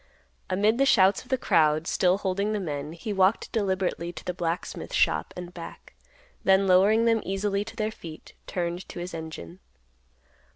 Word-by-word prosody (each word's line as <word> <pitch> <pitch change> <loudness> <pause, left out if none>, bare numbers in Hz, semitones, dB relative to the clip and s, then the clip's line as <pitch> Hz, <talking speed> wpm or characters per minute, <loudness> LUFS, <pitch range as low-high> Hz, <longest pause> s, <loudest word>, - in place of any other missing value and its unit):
Amid 210 +6 +2
the 275 - +5
shouts 195 -5 +5
of 250 - -18
the 260 - +2
crowd, 155 -7 +2
still 185 +2 +2
holding 200 +2 -1
the 210 - -1
men, 150 -4 -4
he 205 +5 -5
walked 190 +2 +2
deliberately 190 -5 -1
to 155 - -10
the 180 - -2
blacksmith 170 0 -4
shop 75 0 +2
and 180 0 -7
back; 170 -2 -10 0.5
then 190 +1 +4
lowering 200 +5 +4
them 225 -1 +3
easily 200 +1 -1
to 225 - -10
their 215 -1 -1
feet, 160 -6 -11
turned 175 0 -3
to - - -9
his 175 +1 -5
engine. 155 - -8
185 Hz, 170 wpm, -26 LUFS, 170-205 Hz, 0.5 s, the